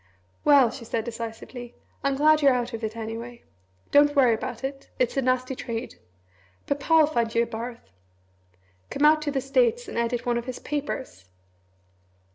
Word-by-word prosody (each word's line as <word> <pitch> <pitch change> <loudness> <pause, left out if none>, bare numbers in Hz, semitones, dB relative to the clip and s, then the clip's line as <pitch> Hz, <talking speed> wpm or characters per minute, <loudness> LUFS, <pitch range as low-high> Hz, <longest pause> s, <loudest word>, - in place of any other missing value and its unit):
"Well," 275 -5 +6
she 245 - -9
said 225 0 -2
decisively, 235 +1 -7 0.3
"I'm 275 0 +1
glad 305 +2 +4
you're 275 -3 +5
out 245 0 -2
of 230 0 -5
it, 220 +1 -4
anyway. 230 +2 -6 0.5
Don't 290 +1 +5
worry 255 -4 +5
about 230 +2 -5
it. 270 0 -5
It's 250 -2 0
a 270 - +2
nasty 255 0 0
trade. 230 -2 -6 0.7
Papa'll 305 +3 +3
find 235 -6 -1
you 230 - +4
a - - -2
berth. 230 - -7 1.0
Come 290 - +1
out 305 0 +6
to 305 - -2
the 270 -1 -1
States 475 - +1
and - - -3
edit 235 0 -1
one 240 -1 +1
of 235 - -8
his 255 -1 -5
papers!" 270 - -5
250 Hz, 170 wpm, -25 LUFS, 230-285 Hz, 1.0 s, Well